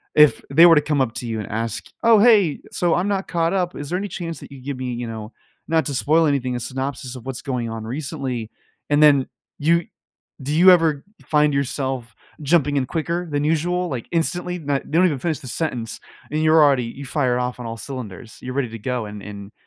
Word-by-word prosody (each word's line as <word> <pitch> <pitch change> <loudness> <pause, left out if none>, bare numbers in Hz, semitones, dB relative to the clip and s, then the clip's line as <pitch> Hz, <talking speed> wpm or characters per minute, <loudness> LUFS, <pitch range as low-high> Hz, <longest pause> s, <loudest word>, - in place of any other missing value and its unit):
if 150 -1 +6
they 165 +5 +7
were 170 -1 +8
to 150 - +5
come 150 -2 0
up 120 -3 0
to 120 - -4
you 110 -1 -3
and 105 - -5
ask, 115 +1 -3 0.2
"Oh, 230 -2 +6
hey, 205 -8 +5
so 175 -2 +1
I'm 180 +3 0
not 195 -1 -1
caught 165 0 0
up, 180 -2 -1
is 145 -1 -6
there 180 - 0
any 205 - -3
chance 170 -5 -6
that - - -12
you 135 -2 -11
give 140 +1 -5
me, 130 -1 -3
you 120 0 -4
know- 110 -1 -7 0.4
not 160 0 +2
to 145 - -3
spoil 155 +5 +3
anything- 130 -4 0
a - - -2
synopsis 130 0 -4
of 125 - -10
what's 130 -2 -5
going 125 -4 -2
on 115 -1 -5
recently?" 130 -3 -4 0.4
And 145 0 +3
then 140 -3 +5 0.3
you 170 +3 +2 0.6
do 140 +3 -3
you 180 +4 +7
ever 160 -5 +3 0.2
find 150 -1 +3
yourself 130 -4 -2 0.3
jumping 145 -1 +2
in 135 - +1
quicker 170 +4 -2
than 145 -1 -1
usual, 175 +4 0
like, 125 -4 -5
instantly? 175 +1 -1
Not 145 -3 -1
they 160 - -1
don't 185 - +6
even 150 -7 +1
finish 160 +2 -2
the 130 - -10
sentence, 120 -7 -3 0.3
and 155 +1 0
you're 155 0 +6
already 135 -4 +3
you 135 +4 -8
fire 130 -3 0
off 125 0 -3
on 125 - -6
all 115 0 -4
cylinders, 115 -3 -8
you're 125 0 -5
ready 135 -4 0
to 115 0 -8
go 125 0 -2
and 105 0 -8
and 100 -1 -9
140 Hz, 230 wpm, -22 LUFS, 125-165 Hz, 0.6 s, were